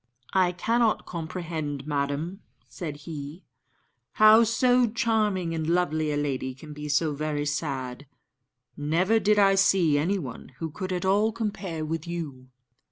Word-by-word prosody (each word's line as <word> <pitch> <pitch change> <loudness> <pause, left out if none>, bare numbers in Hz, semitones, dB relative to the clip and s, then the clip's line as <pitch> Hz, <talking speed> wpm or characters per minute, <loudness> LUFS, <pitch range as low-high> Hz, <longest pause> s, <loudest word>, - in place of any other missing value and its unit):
"I 185 -2 +3
cannot 230 +5 +1
comprehend, 160 -4 -4
madam," 150 +6 -2 0.3
said 150 -5 -7
he, 155 +2 -7 0.7
"how 215 +2 +7
so 245 +2 +3
charming 215 -7 0
and 160 -1 -2
lovely 155 -3 +1
a 145 - -1
lady 130 -3 -2
can 150 +3 -11
be 150 0 -7
so 150 +1 +2
very 150 0 -2
sad. 140 -3 -3 0.7
Never 175 +9 +2
did 210 0 +3
I 195 -1 +5
see 185 -6 +4
anyone 150 -7 -3
who 160 -2 -4
could 185 +3 -5
at 180 0 -2
all 205 +3 +3
compare 200 -8 -4
with 165 +1 -4
you." 150 -7 -6
165 Hz, 140 wpm, -26 LUFS, 145-195 Hz, 0.7 s, how